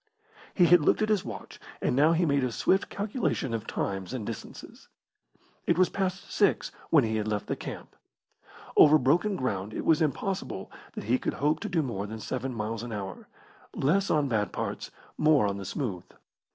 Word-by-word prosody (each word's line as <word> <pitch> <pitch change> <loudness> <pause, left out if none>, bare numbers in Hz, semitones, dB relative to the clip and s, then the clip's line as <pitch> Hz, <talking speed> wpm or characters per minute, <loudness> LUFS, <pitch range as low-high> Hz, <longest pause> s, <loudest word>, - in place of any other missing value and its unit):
He 180 - +6
had 175 0 +6
looked 180 - +3
at 215 - 0
his 210 -3 +2
watch, 110 -4 -8 0.2
and - - 0
now 150 +5 +5
he 170 +1 +2
made 140 -3 +2
a 125 - 0
swift 190 - +1
calculation 200 - -2
of 115 0 -3
times 95 +2 -3
and 120 -5 -4
distances. - - -8 0.8
It 170 - +3
was 185 0 +4
past 190 -1 -3
six 200 -2 +2 0.2
when 150 -5 +5
he 110 -1 0
had 105 0 -2
left 105 -2 -1
the - - -2
camp. - - -8 0.8
Over 155 +1 +8
broken 170 +10 +2
ground 105 - -3
it - - -4
was 160 -1 +4
impossible 160 - -2 0.2
that - - -6
he 120 +4 +1
could - - -2
hope 150 +2 +1
to 220 - -4
do 170 -4 +1
more 105 -6 -3
than 110 +1 -7
seven 130 +4 -3
miles 110 -1 -3
an 120 0 -6
hour 100 -3 -6 0.5
less 190 +9 +2
on 150 -2 +2
bad 105 -6 0
parts, - - -4 0.3
more 150 -7 +5
on 100 -1 -1
the 100 - -6
smooth. 100 -3 -3
135 Hz, 190 wpm, -28 LUFS, 110-170 Hz, 0.8 s, Over